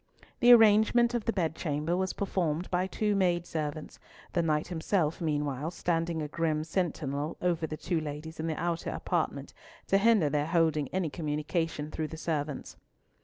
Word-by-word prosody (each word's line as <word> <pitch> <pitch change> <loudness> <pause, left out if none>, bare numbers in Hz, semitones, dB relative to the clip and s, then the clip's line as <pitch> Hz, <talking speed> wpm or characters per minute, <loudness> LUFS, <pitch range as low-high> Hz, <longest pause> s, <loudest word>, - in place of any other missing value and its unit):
The 245 -1 +7
arrangement 225 +1 +6
of 235 -3 -1
the - - +2
bed 165 -6 -1
chamber 155 +1 -1
was 185 +1 -1
performed 175 -4 -1
by 180 +1 +1
two 210 +1 0
maidservants, 170 -5 -1 0.3
the 175 - +2
Knight 155 -1 0
himself 165 -1 0
meanwhile 150 -2 -1
standing 165 -2 -1
a - - -3
grim 155 0 -1
sentinel 155 -3 -2
over 170 -3 0
the 155 - -5
two 170 -1 -1
ladies 155 +2 -7
in 160 - -2
the 160 - -2
outer 170 0 -2
apartment - - -2 0.3
to 195 - +3
hinder 215 -6 +4
their 145 +1 0
holding 160 -4 +2
any 180 -2 -2
communication 155 0 -2
through 155 - -3
the 160 - -8
servants. 150 -3 -3
165 Hz, 165 wpm, -29 LUFS, 150-180 Hz, 0.3 s, The